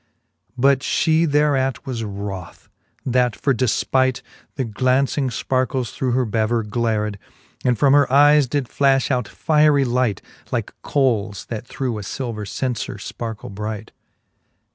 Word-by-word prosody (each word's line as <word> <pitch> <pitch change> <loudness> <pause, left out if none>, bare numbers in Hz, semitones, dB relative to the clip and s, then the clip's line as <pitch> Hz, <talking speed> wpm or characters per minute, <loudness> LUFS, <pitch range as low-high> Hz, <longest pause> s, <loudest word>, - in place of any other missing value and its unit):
But 135 +1 +4
fhe 160 +3 +2
thereat 140 -3 +1
was 125 -4 -4
wroth, 100 -3 -7 0.4
that 125 -2 +2
for 140 - +1
defpight 130 +2 +1 0.3
The 135 - -1
glauncing 130 +4 +1
fparkles 130 0 -1
through 130 -2 -1
her 130 0 +2
bever 110 +1 0
glared, 105 -1 -1 0.4
And 125 -2 +2
from 140 +4 +4
her 145 -2 +4
eies 145 0 +6
did 140 +1 -1
flafh 135 +1 +2
out 125 -4 0
fiery 150 -3 +3
light, 120 -5 0 0.3
Like - - -2
coles, 115 -8 0
that 115 +1 -5
through 125 -5 -3
a - - -5
filver 110 0 -5
cenfer 125 -3 -3
fparkle 110 +1 -6
bright. 105 +1 -5
125 Hz, 135 wpm, -21 LUFS, 110-135 Hz, 0.4 s, eies